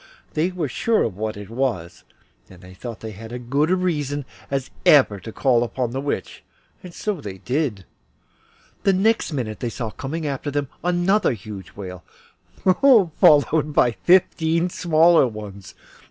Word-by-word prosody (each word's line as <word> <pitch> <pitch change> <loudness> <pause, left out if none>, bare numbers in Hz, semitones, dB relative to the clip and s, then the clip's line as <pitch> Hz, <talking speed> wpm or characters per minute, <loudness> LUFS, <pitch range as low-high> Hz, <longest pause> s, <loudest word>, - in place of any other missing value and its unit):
They 160 +4 +1
were 180 -5 -3
sure 225 - +1
of - - -3
what 110 +1 -4
it 105 -1 -8
was, 115 -9 -3 0.4
and 90 0 -15
thought 115 +3 -8
they 110 - -6
had 110 +3 -10
as 120 0 -6
good 145 +3 +2
reason 150 -7 -1 0.2
as 135 -1 -3
ever 145 -3 +6
they 105 - -7
would 95 - -15
have 110 - -8
to - - -15
call 120 -3 +2
on 125 -3 0
the 135 +2 -3
Witch, 140 -9 -4 0.4
and 180 - -10
so 195 -1 -4
they 95 -6 -7
did. 125 - -2 1.0
The 195 - +3
next 215 +1 +1
minute 115 -8 -4
they 120 - -2
saw 115 -1 -5
coming 155 +7 -5
after 140 0 -3
them 145 -1 -2
another 180 0 +2
huge 100 -3 -9
whale, 90 -3 -8 0.6
followed 165 - +4
by 125 - +4
fifteen 170 +3 +2
smaller 165 -3 +4
ones. 105 -4 -9
140 Hz, 165 wpm, -22 LUFS, 110-165 Hz, 1.0 s, ever